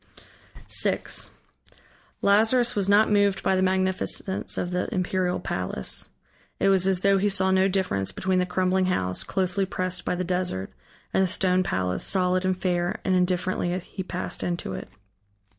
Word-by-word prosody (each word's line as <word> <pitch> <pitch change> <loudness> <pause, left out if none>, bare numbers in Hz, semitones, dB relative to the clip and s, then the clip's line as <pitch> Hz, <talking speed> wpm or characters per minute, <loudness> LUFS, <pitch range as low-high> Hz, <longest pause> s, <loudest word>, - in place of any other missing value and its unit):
VI - - +2 1.2
Lazarus 225 +4 +3
was 200 -1 +1
not 210 +2 +5
moved 205 -1 +2
by 190 - +2
the 185 - +1
magnificence 190 0 -1
of 175 - -2
the 180 +5 -2
imperial 185 -2 -1
palace. 90 -8 -2 0.5
It 195 - +3
was 190 -1 +3
as 190 -2 +1
though 195 0 +3
he 205 +2 +2
saw 190 -1 +2
no 190 0 +4
difference 140 - -1
between 185 - 0
the 180 - 0
crumbling 185 +1 +1
house, 90 - 0
closely 190 - -1
pressed 185 -1 -2
by - - -1
the 180 - -2
desert, 180 - -2 0.4
and - - +3
the 190 - +3
stone 185 0 +2
palace, 90 - -1
solid 185 -1 +1
and 185 -1 +1
fair, 180 +2 -1
and 190 - +2
indifferently 180 0 0
he 190 +2 -7
passed 185 0 -4
into 175 - -3
it. - - -7
185 Hz, 160 wpm, -25 LUFS, 180-190 Hz, 1.2 s, not